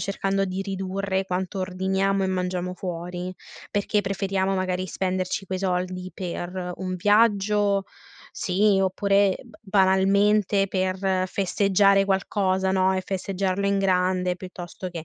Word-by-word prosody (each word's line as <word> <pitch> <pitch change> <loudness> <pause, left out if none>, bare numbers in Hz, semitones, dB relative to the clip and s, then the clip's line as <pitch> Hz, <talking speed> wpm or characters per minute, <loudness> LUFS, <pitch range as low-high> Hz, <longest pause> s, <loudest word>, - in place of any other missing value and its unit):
cercando 195 0 0
di 185 0 -3
ridurre 195 0 -2
quanto 190 +1 -3
ordiniamo 190 +1 0
e - - +1
mangiamo 180 -1 -2
fuori, 180 0 -5 0.4
perché 205 +1 +1
preferiamo 195 -1 -1
magari 185 0 -1
spenderci 185 0 -2
quei 185 +1 -3
soldi 185 0 -2
per 180 0 -5
un 185 -1 -3
viaggio, 205 0 +3 0.5
sì, 195 +1 +2
oppure, 195 +1 +2
uhm, 245 - -16
b - - -21
banalmente 195 +1 +3
per 185 0 0
festeggiare 195 +1 +3
qualcosa, 190 -1 0
no, 190 0 +3
e 185 - -1
festeggiarlo 195 +1 -2
in 200 0 +2
grande 185 -1 +1
piuttosto 180 0 -8
che 170 -3 -7
190 Hz, 130 wpm, -25 LUFS, 185-195 Hz, 0.5 s, viaggio